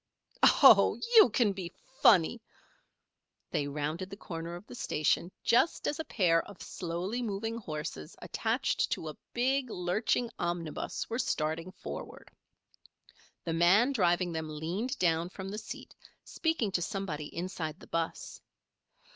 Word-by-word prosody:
"Oh, - - +7 0.2
you 435 - +9
can 215 -2 +2
be 185 -3 -6 0.3
funny 200 +3 +5 0.5
" - - -54
They 145 - 0
rounded 150 +6 -3
the 200 - -8
corner 170 -2 -6
of 175 - -10
the - - -11
station 170 -5 0
just 240 +8 +2
as 295 - -2
a - - -1
pair 170 -10 +3
of 200 - -12
slowly 180 +7 -4
moving 225 0 -3
horses 150 - -6
attached - - 0
to 160 - -5
a 150 - -9 0.2
big, 260 +1 +1
lurching 215 +6 0
omnibus, 175 -2 -3
were 230 - -3
starting 160 -2 -1
forward. - - -8 1.1
The 165 - -2
man 185 +10 +5
driving 180 -6 +2
them 160 -1 -4
leaned 175 - -3
down 165 -1 +1
from 190 +1 -7
the 210 +2 -4
seat, 220 - -9 0.3
speaking 320 - -1
to 180 - 0
somebody 165 -6 -3
inside 170 -2 -5
the - - -13
'bus. 165 -1 -4
180 Hz, 140 wpm, -31 LUFS, 165-220 Hz, 1.1 s, you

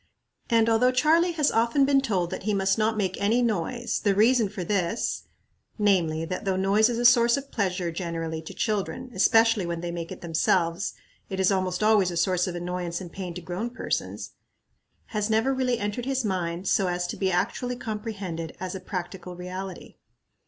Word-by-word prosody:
And 230 -1 +4
although 230 +2 +4
Charlie 325 +7 +3
has 300 -3 +2
often 235 +5 +3
been 275 0 +4
told 185 -9 -1
that - - -4
he 210 +1 0
must 195 0 +2
not 220 0 +1
make 190 -2 -1
any 225 +5 +3
noise, 235 +3 -1
the 200 -2 +1
reason 225 +1 +4
for 195 -2 -5
this 195 +3 -1 0.5
namely, 175 -7 +2
that 185 +4 -4
though 195 -2 0
noise 200 +4 +3
is 235 - -1
a 240 - 0
source 235 +1 +6
of 280 0 -7
pleasure, 185 -4 -1
generally, 165 -2 -4
to 160 - -9
children, 220 +5 -2
especially 225 +1 +4
when 170 -1 -3
they 175 0 -3
make 170 -1 -5
it - - -8
themselves, 170 +1 0 0.4
it 190 -1 -4
is 190 +1 +3
almost 185 0 0
always 210 -4 +4
a 175 - -4
source 180 +1 +1
of 180 - -4
annoyance 175 0 -3
and 180 -3 -8
pain 180 -3 -6
to 180 - -6
grown 180 +7 -4
persons 245 - -4 0.8
has 210 0 0
never 225 +5 +2
really 255 -2 0
entered 210 +3 -3
his 265 -2 -1
mind 180 -2 -2
so 195 - +2
as 175 0 -1
to 175 - -4
be 190 -1 0
actually 235 +7 -1
comprehended 205 -8 -5
us 185 -1 -4
a 190 - -5
practical 180 -1 -6
reality. 185 +1 -7
195 Hz, 190 wpm, -26 LUFS, 180-230 Hz, 0.8 s, source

